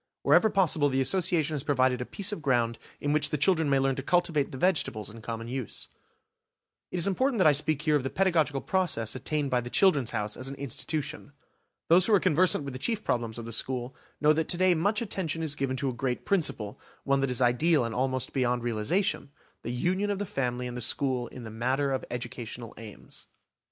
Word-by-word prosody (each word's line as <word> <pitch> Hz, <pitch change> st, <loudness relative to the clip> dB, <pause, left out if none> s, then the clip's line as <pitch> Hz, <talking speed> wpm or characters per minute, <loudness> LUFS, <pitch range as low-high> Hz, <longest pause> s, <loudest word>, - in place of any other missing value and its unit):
Wherever 220 Hz, -, +5 dB
possible 165 Hz, -7 st, +2 dB
the 135 Hz, 0 st, 0 dB
Association 165 Hz, +1 st, +1 dB
has 145 Hz, -, -1 dB
provided 130 Hz, -3 st, +1 dB
a 125 Hz, -, -5 dB
piece 200 Hz, +1 st, -1 dB
of 205 Hz, -, -5 dB
ground 120 Hz, -5 st, +1 dB, 0.2 s
in 145 Hz, 0 st, -1 dB
which 150 Hz, -1 st, +3 dB
the 150 Hz, -, -1 dB
children 160 Hz, 0 st, +2 dB
may 140 Hz, -, +3 dB
learn 135 Hz, 0 st, +1 dB
to -, -, -2 dB
cultivate 165 Hz, -2 st, +1 dB
the 130 Hz, -, -6 dB
vegetables 130 Hz, -, 0 dB
in 115 Hz, +1 st, -11 dB
common 115 Hz, 0 st, -5 dB
use. 125 Hz, -2 st, -5 dB, 1.0 s
It -, -, -3 dB
is 170 Hz, -, +4 dB
important 245 Hz, +6 st, +1 dB
that 185 Hz, -, +3 dB
I 155 Hz, -, +8 dB
speak 150 Hz, +1 st, 0 dB
here 155 Hz, -2 st, +2 dB
of 145 Hz, -, +2 dB
the 135 Hz, -, -3 dB
pedagogical 160 Hz, -8 st, +1 dB
progress 155 Hz, -, 0 dB
attained 145 Hz, +2 st, -2 dB
by 125 Hz, -1 st, +2 dB
the 120 Hz, -, -7 dB
"Children's 145 Hz, -, +3 dB
House" 105 Hz, -2 st, -2 dB
as 130 Hz, -, -5 dB
an 135 Hz, -, -4 dB
institution. 140 Hz, +2 st, -4 dB, 0.5 s
Those 175 Hz, +2 st, +6 dB
who 220 Hz, -, +5 dB
are -, -, +4 dB
conversant 180 Hz, -2 st, +2 dB
with 140 Hz, -2 st, -6 dB
the 130 Hz, -, -6 dB
chief 220 Hz, -, -1 dB
problems 115 Hz, -2 st, -2 dB
of 115 Hz, -, -6 dB
the 115 Hz, -, -5 dB
school 125 Hz, +2 st, -2 dB, 0.2 s
know 150 Hz, +1 st, +4 dB
that 160 Hz, 0 st, -1 dB
to 175 Hz, -, +3 dB
day 185 Hz, 0 st, +4 dB
much 205 Hz, +7 st, +1 dB
attention 165 Hz, -6 st, -3 dB
is 155 Hz, -3 st, 0 dB
given 135 Hz, -3 st, -2 dB
to 140 Hz, 0 st, -1 dB
a -, -, -3 dB
great 125 Hz, +1 st, -3 dB
principle, 135 Hz, -, -1 dB, 0.2 s
one 140 Hz, 0 st, +2 dB
that 135 Hz, -1 st, 0 dB
is 125 Hz, -, 0 dB
ideal 130 Hz, +3 st, +3 dB
and 115 Hz, -, -4 dB
almost 130 Hz, +1 st, -1 dB
beyond 125 Hz, -2 st, 0 dB
realisation,–the 120 Hz, -, -2 dB
union 185 Hz, +11 st, 0 dB
of 200 Hz, -, -1 dB
the 205 Hz, -, -3 dB
family 125 Hz, -6 st, -2 dB
and 125 Hz, 0 st, -5 dB
the 125 Hz, -, -5 dB
school 130 Hz, 0 st, +1 dB
in 125 Hz, -, -10 dB
the 110 Hz, -, -8 dB
matter 130 Hz, +5 st, 0 dB
of 130 Hz, -, -2 dB
educational 120 Hz, -1 st, -6 dB
aims. 110 Hz, -1 st, -10 dB
140 Hz, 220 wpm, -28 LUFS, 125-165 Hz, 1.0 s, I